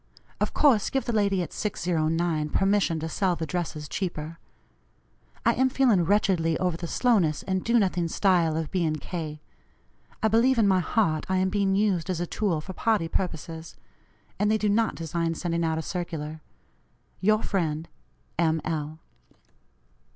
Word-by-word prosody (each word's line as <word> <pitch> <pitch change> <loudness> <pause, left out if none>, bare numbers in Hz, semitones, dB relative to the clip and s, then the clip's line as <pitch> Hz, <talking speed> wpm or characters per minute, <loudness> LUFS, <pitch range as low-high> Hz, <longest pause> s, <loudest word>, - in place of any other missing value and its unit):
Of - - -1
course 250 -9 +4
give 270 - -1
the 240 - -2
lady 200 -3 +2
at - - -8
609 165 -4 -1
permission 195 -2 +2
to 160 - -2
sell 180 +2 0
the 160 - -3
dresses 155 -3 -4
cheaper. 165 -2 -4 1.1
I - - +5
am 260 0 +2
feeling 240 -10 +3
wretchedly 180 -4 +2
over 180 -3 0
the 170 +1 -5
slowness 185 - +2
and 190 -1 -1
do 235 +1 +3
nothing 180 -5 +1
style 170 -3 +2
of 160 -2 -3
B. 175 -4 +1
& - - -6
K. 155 -4 -6 0.8
I - - +5
believe 235 +4 +3
in 220 -3 +4
my 190 -1 +4
heart 170 -4 0
I 190 - +2
am 190 0 +2
being 195 -1 +1
used 195 -5 +1
as 180 -3 -1
a 175 - -1
tool 175 -3 -1
for 190 +4 -8
party 215 -4 +1
purposes; 165 -2 -4 0.6
and 210 - +2
they 220 - +3
do 210 -1 0
not 225 +2 +2
design 165 0 -2
sending 170 0 -1
out 160 -1 0
a 160 - -3
circular. 160 -4 -5 0.8
"Your 215 +3 +3
friend, 165 -4 -1 0.5
M. 160 -1 +2
L." 155 -1 -3
175 Hz, 165 wpm, -26 LUFS, 160-205 Hz, 1.1 s, I